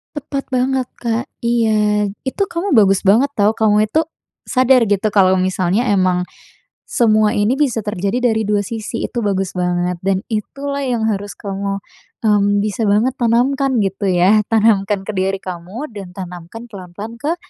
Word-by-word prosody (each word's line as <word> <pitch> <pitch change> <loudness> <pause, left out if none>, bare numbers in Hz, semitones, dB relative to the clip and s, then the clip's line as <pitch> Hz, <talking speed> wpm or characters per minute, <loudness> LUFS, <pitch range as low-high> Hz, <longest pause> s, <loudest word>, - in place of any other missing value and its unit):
Tepat 280 -1 -4
banget, 255 0 +1
Kak, 235 +1 -2 0.2
iya. 215 -3 +2 0.2
Itu 390 +9 -1
kamu 370 +3 -3
bagus 195 -2 +4
banget 220 +8 +4
tahu, 205 0 +3
kamu 215 -1 +2
itu 315 - +2 0.5
sadar 255 -2 +4
gitu 205 +1 +1
kalau 190 -2 +4
misalnya 185 +3 +1
emang 185 -2 +2 0.6
semua 215 -2 +3
ini 210 +3 +2
bisa 255 -7 +1
terjadi 210 +5 0
dari 220 0 0
dua 205 -1 +1
sisi, 225 +2 -4
itu - - -6
bagus 195 -2 -1
banget 180 0 -1
dan 190 0 0
itulah 280 +6 -3
yang 240 -4 -1
harus 205 0 -4
kamu, 195 0 -4 0.5
mmm, 205 -1 +3
bisa 210 +2 -2
banget 215 +6 +2
tanamkan 255 +3 +1
gitu 195 +1 -2
ya, 190 +3 +4
tanamkan 210 -3 +2
ke 215 - -3
diri 195 +1 0
kamu 185 - -7
dan 190 -3 -9
tanamkan 180 +4 -8
pelan-pelan 200 +3 -8
ke 300 +7 -1
210 Hz, 155 wpm, -18 LUFS, 195-240 Hz, 0.6 s, bagus